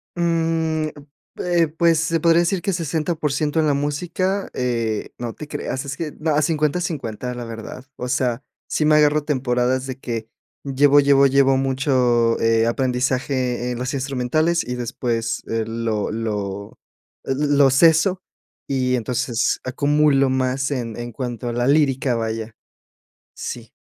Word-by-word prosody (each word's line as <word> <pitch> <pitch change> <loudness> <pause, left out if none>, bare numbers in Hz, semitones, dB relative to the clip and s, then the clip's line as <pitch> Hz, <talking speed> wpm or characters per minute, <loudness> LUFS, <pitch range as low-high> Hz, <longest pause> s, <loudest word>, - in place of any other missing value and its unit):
Mm, 165 -2 0 0.5
eh, 175 -2 +2
pues, 165 -1 +4
se 165 +1 0
podría 165 +1 +4
decir 175 +1 0
que 195 - -1
60% 155 -2 -1
en 155 - +1
la 145 - +3
música, 175 +7 -1
eh, 115 -4 -2
no 120 -2 -5
te 150 - -9
creas. 135 -2 -4
Es 140 0 -4
que, 155 0 -4
no, 155 0 0
a 150 - +3
50/50, 150 -6 -1
la 120 -1 -6
verdad. 115 +3 -8
O 125 - -5
sea, 125 -1 0 0.2
sí - - 0
me 155 0 +5
agarro 150 0 +4
temporadas 130 -2 0
de 130 - -5
que 115 -3 -4 0.4
llevo, 140 +1 +4
llevo, 140 -1 +5
llevo 135 0 +4
mucho, 130 -3 +2
eh, 115 0 +3
aprendizaje 125 0 0
en 120 - -4
las 125 +1 -3
instrumentales 140 +5 0
y 125 - -3
después, 120 -1 -2
eh, 115 0 -1
lo 115 -2 -2
lo 100 -3 -4 0.5
l 135 +3 -1
lo 140 -1 +6
ceso. 165 +6 +4 0.5
Y 130 -2 +1
entonces 120 0 -1
acumulo 140 +1 +2
más 130 +1 0
en 120 -5 -3
en 120 0 -5
cuanto 120 -1 -5
a - - -3
la 120 +1 0
lírica, 135 -3 +2
vaya. 110 0 -3 0.8
Sí. - - -7
135 Hz, 150 wpm, -21 LUFS, 120-150 Hz, 0.8 s, lo